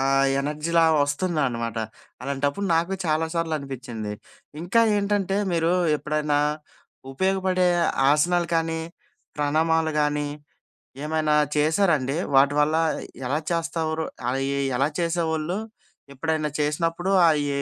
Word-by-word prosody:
ఆహ్, 135 0 +3
ఎనర్జీ‌లా 150 +4 0 0.2
వస్తుందనమాట. 140 - -1 0.4
అలాంటప్పుడు 140 +8 -2
నాకు 170 +4 +1
చాలా 160 0 +1
సార్లు 165 -1 -1
అనిపించింది. 125 -6 -6 0.5
ఇంకా 195 +7 +2 0.2
ఏంటంటే 200 -1 0 0.2
మీరు 165 0 +1 0.3
ఎప్పుడైనా, 150 -1 -1 0.7
ఉపయోగపడే 190 +2 +1 0.4
ఆసనాలు 170 +3 +2
కానీ 165 0 0 0.6
ప్రణామాలు 160 +2 +1
గానీ 150 0 0 0.8
ఏమైనా 155 -1 +1 0.2
చేశారా 160 +4 +3
అండి? 135 +3 -3 0.2
వాటివల్ల 145 +3 +4 0.5
ఎలా 145 +3 +1
చేసేవారు? 165 -1 -2 0.2
అయి 135 +1 -1 0.3
ఎలా 135 +3 +2
చేసేవాళ్ళు? 165 +1 -1 0.6
ఎప్పుడైనా 155 +2 -1
చేసినప్పుడు 165 +5 0 0.2
అయి 145 -2 0
155 Hz, 100 wpm, -24 LUFS, 145-170 Hz, 0.8 s, వాటివల్ల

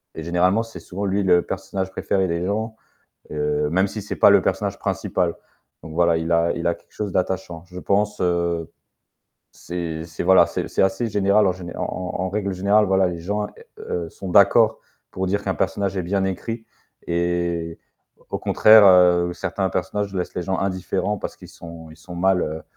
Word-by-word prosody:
et - - -6
généralement, 90 +5 +2
c'est 115 0 -10
souvent 100 +2 -5
lui 100 +1 0
le 90 -2 +4
personnage 95 0 -4
préféré 95 0 0
des 85 0 -2
gens, 110 +3 -2 0.6
heu, 75 0 -1
même 95 +4 +2
si 105 +1 -6
c'est 105 - -5
pas - - +6
le - - +5
personnage - - -1
principal 90 -2 -1 0.5
donc 80 0 -9
voilà, 85 0 +3
il 80 +1 -2
a 85 0 +3
il 85 - -4
a 85 - +2
quelque - - -22
chose 105 -3 -4
d'attachant. 90 -2 -2
Je 90 0 -10
pense, 105 +3 0
heu, 85 -2 0 0.8
c'est 85 -2 -5
c'est 85 0 -7
voilà, 95 - +6
c'est - - -4
c'est - - -1
assez 95 +5 0
général, 100 0 +3
en 90 - +1
géné 90 -2 -9
en - - -3
en 90 -1 -4
en 95 - -2
règle 100 0 -2
générale, 100 +3 +3
voilà, 95 -1 +3
les 85 -1 -5
gens, 105 +4 -2 0.3
heu, 85 -2 -4
sont 95 +3 -8
d'accord 110 +4 +5 0.3
pour 95 0 -3
dire 100 +2 0
qu'un 95 -2 -1
personnage 100 +4 -1
est 90 - -1
bien 95 +2 0
écrit 115 +5 -4 0.4
et 85 -1 -1 0.5
au - - -2
contraire, 110 0 +6
heu, 90 -2 +5
certains - - -2
personnages 105 -1 -2
laissent 90 -2 -4
les 90 - -2
gens 95 +1 -1
indifférents. 95 +2 -2
Parce - - -6
qu'ils - - -13
sont 85 -1 -11
ils 80 - -15
sont 90 -2 -11
mal, 95 +1 +2
heu, 80 +1 -4
90 Hz, 195 wpm, -22 LUFS, 85-100 Hz, 0.8 s, pas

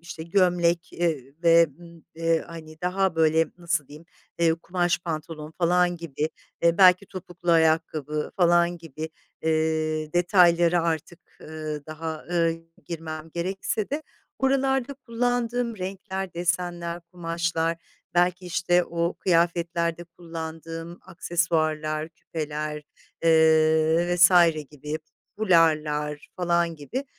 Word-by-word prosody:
işte, 165 -1 -8
gömlek, 175 -1 +1
eee, 175 -1 +1
i 135 +2 -19
ve, 170 0 +6
ımm, 170 -1 -15
eee, 165 0 +1
hani, 155 -1 -11
daha, 185 0 0
böyle, 160 0 +4
nasıl 170 -5 -1
diyeyim, 150 +3 -12 0.3
eee, 165 -1 +3
kumaş 175 +1 -1
pantolon 155 -2 -6
falan 175 0 +3
gibi, 155 -2 -3 0.3
e, 170 +2 +3
belki 185 +1 +6
topuklu 175 -2 -5
ayakkabı 160 -2 +1
falan 175 -1 +3
gibi, 160 -1 -7 0.3
eee, 155 -1 0
detayları 175 -1 +4
artık, 165 +1 -3 0.2
ııı, 155 -2 -6
daha, 155 0 -6
ııı, 165 -1 +2 0.3
girmem 160 -1 -6
gerekse 195 +4 -2
de 295 +3 -2 0.4
buralarda 270 0 +1
kullandığım 245 -2 -1
renkler, 190 0 -5
desenler, 175 0 -2
kumaşlar 165 -1 -1 0.4
belki, 180 +1 +2
işte, 175 0 +2
o 170 +1 -2
kıyafetlerde 170 -1 +1
kullandığım 165 0 -8
aksesuarlar, 160 -3 -1
küpeler, 150 -2 -5 0.4
eee, 160 +1 +4
vs. 175 +1 +7 0.4
gibi 150 +1 -5 0.4
fularlar 155 -6 +2
falan 170 -2 +1
gibi, 240 - -5
170 Hz, 110 wpm, -25 LUFS, 160-175 Hz, 0.4 s, vs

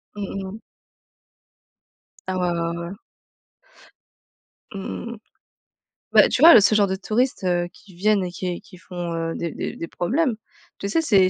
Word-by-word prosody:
Mmh 195 -1 -5
mh. 220 - -10 1.7
Ah 185 0 -1
ouais, 180 -1 +1
ouais, 170 0 -2
ouais. 190 - -7 1.8
Mmh 200 +4 -5
mh. 235 - -8 0.9
Bah, - - +7
tu - - -1
vois, 335 +1 +10
le - - +10
ce 205 +2 +4
genre 205 -2 +4
de 190 - -1
touristes, 225 +3 0
heu, 175 -1 +1
qui 195 -3 -18
viennent 200 +2 +2
et 180 - -5
qui 180 -1 -4
qui 185 - -16
font, 175 -1 -5
heu, 165 0 -2
des 170 -2 -3
des - - -5
des 165 - -5
problèmes. 250 - 0 0.4
Tu 200 - -3
sais, 325 +11 +2
c'est 195 -11 +4
190 Hz, 165 wpm, -23 LUFS, 175-215 Hz, 1.8 s, vois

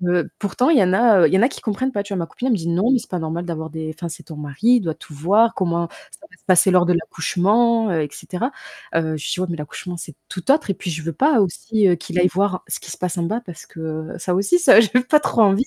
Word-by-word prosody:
heu, 175 - 0
pourtant 210 - 0
il 325 - +5
y 205 - +5
en 180 - +1
a, 220 -3 +5
heu, - - +7
il - - -3
y 190 - +5
en - - +3
a - - +6
qui - - -10
comprennent 245 +5 -2
pas, 200 - -1
tu 205 - -13
vois? 190 - -2
Ma 170 - -2
copine 245 - -5
elle 260 - +2
me - - +1
dit: 165 -1 -5
«Non, 185 +9 +1
mais 260 - +3
c'est - - -12
pas 180 - -3
normal 165 +2 -4
d'avoir 160 -2 -5
des 160 0 -5
enfin, 170 0 -5
c'est 155 - -9
ton 160 - -10
mari, 145 -1 -8 0.2
il 235 - -1
doit 165 -3 -2
tout - - -14
voir, 200 +10 +3
comment 170 -2 -1 0.2
ça 310 - -15
va - - -19
se - - -34
passer 185 0 +4
lors 180 -1 +4
de 180 - +2
l'accouchement, 210 +8 +1
heu 160 -3 0
et 145 - -5
cetera», 225 - -4 0.4
heu, 160 -1 0
je 150 - -8
lui - - -3
dis: - - -6
«Ouais, 185 - -1
mais 170 - -3
l'accouchement, 175 +4 -7
c'est 160 -3 -9
tout 185 +9 0
autre» 295 -7 +1
et - - 0
puis, 175 - -6
je 160 -1 -5
veux 165 - -4
pas 275 - +3
aussi, 205 +3 0
heu, 175 - +4
qu'il 175 +2 -4
aille 180 - +5
voir 190 0 -1
ce - - -4
qui - - -9
se - - -7
passe 180 -1 -3
en 170 - -1
bas 220 +8 -2
parce 170 -3 -10
que 160 -1 -6
ça 180 +1 -1
aussi, 200 - +2
ça, 285 -9 +7
j'ai 215 - +1 0.2
pas 300 - +6
trop 230 - +1
envie. 200 +3 +4
180 Hz, 315 wpm, -20 LUFS, 165-220 Hz, 0.4 s, heu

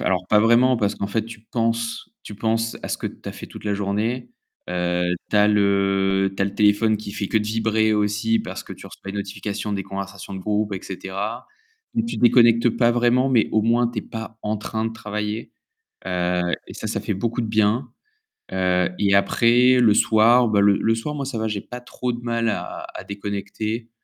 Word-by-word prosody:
alors, 90 0 0
pas 105 - +5
vraiment 120 +3 +4
parce 105 -3 0
qu'en 100 - -3
fait, 110 +2 -1
tu 115 -1 -10
penses 115 0 -1
tu 105 - -9
penses 115 +2 -1
à - - -5
ce - - -1
que - - -4
tu - - -8
as - - -5
fait - - -9
toute - - -12
la 105 -1 0
journée. 105 +5 -2 0.4
Heu, 90 0 0
tu - - 0
as 105 0 +6
le 100 -1 +2
tu - - -9
as - - +4
le 100 - -6
téléphone 105 +1 +3
qui 105 -1 -8
fait 100 -1 -3
que - - +1
de 105 - +1
vibrer 110 0 +1
aussi 105 +2 +1
parce - - -5
que - - -9
tu - - -11
reçois 100 - -9
une 100 - -6
notification 100 +1 -4
des 100 - -2
conversations 100 0 -7
de 95 - -5
groupe 105 +2 -1
et 95 - -3
cetera. 100 +5 -5 0.5
Et 230 - +3
tu 230 - -4
déconnectes 120 -1 +5
pas 120 +1 +2
vraiment, 120 +2 +3
mais 120 -5 +3
au 110 - +4
moins, 115 +2 +2
tu 120 -2 -5
es - - -2
pas 110 0 -8
en 105 +1 -1
train 110 +1 -3
de 115 - -3
travailler, 105 0 -4 0.5
heu, 90 -1 0 0.3
et - - -10
ça, - - -6
ça - - -2
fait - - -2
beaucoup 115 +5 -2
de - - -2
bien. 110 +3 +1 0.6
Heu, 90 -1 +2
et 100 -1 +2
après 120 +5 +4
le 115 -4 +5
soir, 115 +4 +5
bah, 105 -2 +3
le 100 0 +5
le 115 0 +1
soir, 115 +7 -4
moi 140 -2 -3
ça 130 -3 -4
va, 110 0 -1
j'ai 105 -2 -3
pas 125 0 -9
trop 125 0 -4
de 120 - -6
mal 115 -1 -1
à - - -4
à - - -6
déconnecter. 100 +3 -4
110 Hz, 220 wpm, -22 LUFS, 100-115 Hz, 0.6 s, as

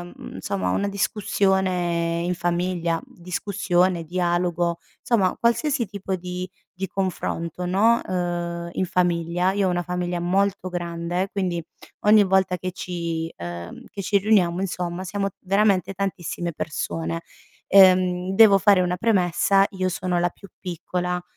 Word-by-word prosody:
mhmm, - - -9
insomma 95 -1 -2
una 200 - 0
discussione 185 -3 0
in 180 - 0
famiglia, 175 -1 -1
discussione, 180 -1 -1
dialogo, 175 0 0 0.3
insomma 200 -6 +2
qualsiasi 235 +1 +1
tipo 195 -1 -4
di 180 0 -5 0.3
di 190 - -2
confronto, 180 -2 -3
no, 215 +6 +3
ehm, 175 -1 -3
in 185 - -1
famiglia 175 0 +1
io 200 0 +1
ho - - +2
una 175 -1 0
famiglia 180 0 -2
molto 190 +1 0
grande, 175 +1 -2
quindi 180 -4 -2 0.4
ogni 210 0 +7
volta 190 -1 +2
che 185 +1 -4
ci, 170 -3 -4
uhm, 85 0 -7
che 200 - -5
ci 200 +1 +2
riuniamo 190 -4 +2
insomma 180 -1 -3
siamo 195 +2 -2
veramente 195 -1 +2
tantissime 180 -3 -3
persone. 85 - -3 0.5
Ehm, 185 -1 +5
devo 200 -1 +7
fare 195 +1 +5
una 180 0 +1
premessa, 195 -1 +3
io 185 -2 -1
sono 180 -1 -1
la 175 +1 +2
più 195 +3 -15
piccola, 180 0 -3
180 Hz, 135 wpm, -23 LUFS, 175-195 Hz, 0.5 s, ogni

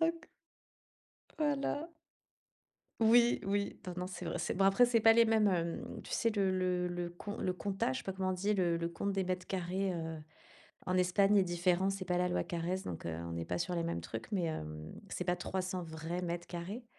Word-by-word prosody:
OK. 330 0 0 1.1
Voilà. 295 +2 -1 1.1
Oui, 235 +2 +5
oui, 200 +1 0
non, 180 - -4
non, 180 0 -2
c'est 185 -1 -7
vrai 170 - -2
c'est - - -1
bon 195 +1 +2
après 195 +6 +6
c'est 235 -1 +3
pas 225 +1 +8
les 230 0 +6
mêmes, 220 -2 +4
hem, 170 -2 -2
tu - - -8
sais 230 - +2
le 195 -3 +1
le 180 -1 +1
le 175 -1 -3
con 205 +4 -7
le 185 - 0
comptage? 190 -8 -1
Je - - -2
sais - - -27
pas 190 - -2
comment 190 0 -2
on - - +2
dit. 200 +3 0
Le 175 -4 +2
le 170 0 -1
compte 185 +4 -2
des 195 -1 0
mètres 180 0 -3
carrés, 185 +1 -1
heu, 160 -2 -4 0.7
en 185 0 0
Espagne 195 +3 +4
est 195 - +5
différent, 180 +2 +2
c'est 195 -1 -4
pas 180 -1 0
la 180 - +2
loi 180 - +1
Carrez 175 +2 -2
donc, 85 -1 -5
heu, 85 - -2
on 85 - -5
n'est 85 0 -3
pas 90 - -2
sur 175 - -1
les 165 - 0
mêmes 165 - -2
trucs 115 - -7
mais, 180 -4 +1
hem, 75 - -5 0.2
c'est - - -3
pas 180 0 +1
300 185 0 -3
vrais 160 +2 -4
mètres 175 0 -3
carrés. 190 +8 -5
180 Hz, 225 wpm, -34 LUFS, 170-200 Hz, 1.1 s, pas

